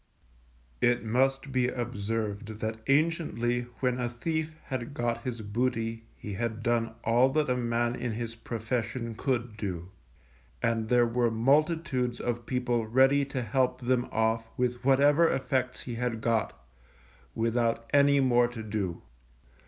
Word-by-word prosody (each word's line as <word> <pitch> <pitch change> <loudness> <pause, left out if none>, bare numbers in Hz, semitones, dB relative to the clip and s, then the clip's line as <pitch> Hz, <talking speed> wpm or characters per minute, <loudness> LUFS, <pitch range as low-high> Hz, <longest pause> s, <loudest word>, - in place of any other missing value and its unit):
It 120 0 +3
must 135 +4 +1
be 130 -1 +2
observed 110 -3 -3
that 110 0 -3
anciently 135 -5 +1
when 125 -1 +1
a 120 -1 -1
thief 155 +6 -3
had 130 +1 -5
got 120 -1 -1
his 120 -2 -4
booty 115 +1 -2
he 105 - -7
had 110 +1 -3
done 115 -1 0
all 120 +3 +4
that 155 -3 +1
a - - +2
man 120 0 0
in 120 -2 -3
his 115 +1 -4
profession 115 +1 -3
could 120 -2 -2
do, 95 -4 -4 0.7
and 115 -1 0
there 120 -1 +5
were 120 0 +1
multitudes 135 +1 +1
of 120 -1 -3
people 125 -3 0
ready 135 +4 +4
to 135 -2 -3
help 125 +2 0
them 125 0 +1
off 110 0 +1
with 125 -1 -1
whatever 145 +5 +5
effects 130 -1 -1
he 120 - -6
had 115 -1 -2
got, 115 -1 0 0.8
without 115 0 0
any 140 0 +5
more 120 -2 +4
to 120 -2 -7
do. 100 -5 -3
120 Hz, 145 wpm, -29 LUFS, 115-130 Hz, 0.8 s, there